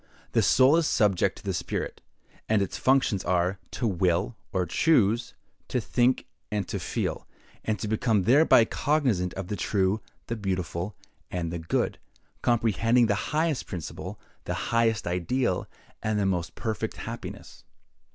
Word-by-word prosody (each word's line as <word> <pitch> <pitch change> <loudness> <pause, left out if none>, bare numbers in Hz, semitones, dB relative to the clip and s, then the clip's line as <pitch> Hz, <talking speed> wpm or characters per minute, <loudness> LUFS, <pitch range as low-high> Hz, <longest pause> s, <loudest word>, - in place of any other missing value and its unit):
The - - +3
soul 135 +5 +5
is 165 -2 +2
subject 105 -5 +2
to - - -13
the - - -2
spirit; - - -3 0.5
and 110 -1 +4
its 95 - -4
functions 130 -7 +2
are, 90 +1 +1
to 120 - -3
will, 95 +1 +1 0.2
or 95 -2 0
choose, 115 - +2 0.3
to - - 0
think, 125 +1 +1 0.3
and 105 -2 -1
to - - -2
feel, - - -3 0.4
and 110 -1 0
to 100 - -4
become 110 -1 +2
thereby 125 - +6
cognizant 125 - +1
of 95 - -4
the 105 - -3
true, 100 +2 +1 0.2
the 115 - -3
beautiful, 95 -2 -3 0.3
and 85 -2 -3
the 85 - -3
good; 80 - -1 0.4
comprehending 115 +1 +3
the 105 - +2 0.2
highest 155 -2 0
principle, 85 -4 -6 0.3
the - - -2 0.2
highest 115 -2 +2
ideal, 90 +4 0 0.3
and 110 -1 0
the 100 - +1
most 90 -3 -1
perfect 110 -3 -3
happiness. - - -8
105 Hz, 150 wpm, -27 LUFS, 90-120 Hz, 0.5 s, thereby